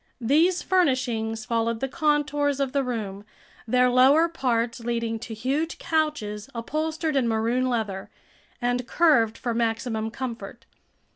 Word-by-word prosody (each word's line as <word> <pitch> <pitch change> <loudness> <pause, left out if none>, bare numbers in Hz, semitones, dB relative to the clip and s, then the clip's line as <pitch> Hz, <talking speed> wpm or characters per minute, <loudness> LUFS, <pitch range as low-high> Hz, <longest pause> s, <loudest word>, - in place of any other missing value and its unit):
These 315 +9 +2
furnishings 245 -10 0
followed 230 -1 0
the 270 - -1
contours 295 -2 0
of 275 -2 0
the 280 0 +1
room, 210 -6 -4 0.4
their 250 +2 +4
lower 265 +6 +5
parts 240 -7 -1
leading 230 -1 -2
to 225 0 -7
huge 280 +9 -2
couches 285 -10 -2
upholstered 310 +6 -2
in 260 -3 +2
maroon 230 +3 +1
leather 210 -5 -3 0.5
and 245 0 -1
curved 230 -10 +3
for 240 - -2
maximum 225 -1 -1
comfort. 240 -1 -7
250 Hz, 130 wpm, -25 LUFS, 225-290 Hz, 0.5 s, lower